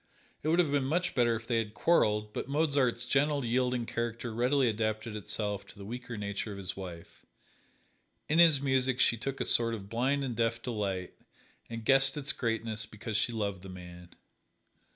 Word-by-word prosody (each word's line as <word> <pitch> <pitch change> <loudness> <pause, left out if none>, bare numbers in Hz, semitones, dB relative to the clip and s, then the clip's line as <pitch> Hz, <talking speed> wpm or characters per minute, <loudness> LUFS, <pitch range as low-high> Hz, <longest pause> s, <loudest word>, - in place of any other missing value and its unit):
It - - -4
would 165 +2 +3
have 170 -5 +3
been 140 -2 +2
much 170 +4 0
better 120 -3 +3
if 115 +1 -6
they 115 -1 +1
had 105 -1 -4
quarreled, 105 -10 +2
but - - -4
Mozart's 140 -5 +1
gentle, 140 +1 +1
yielding 125 0 +1
character 115 0 -3
readily 125 +3 +2
adapted 110 0 -1
itself 105 -1 -3
to - - -14
the 100 - -9
weaker 120 +1 -6
nature 100 +1 -3
of 100 - -7
his 100 0 -5
wife. 90 -3 -9 1.0
In 155 +2 +2
his 165 -5 +7
music 130 -2 +1
she 120 - +4
took 135 +4 -4
a - - -1
sort 115 -1 +2
of 100 -2 -9
blind 130 +5 +1
and 125 -3 -3
deaf 115 0 0
delight 100 -6 -3 0.6
and 115 -1 -6
guessed 135 +1 +5
its 140 -1 -1
greatness 115 -2 -2
because 110 0 -6
she 120 - +2
loved 100 -4 -2
the 95 - -10
man. 90 -1 -10
115 Hz, 185 wpm, -31 LUFS, 105-135 Hz, 1.0 s, his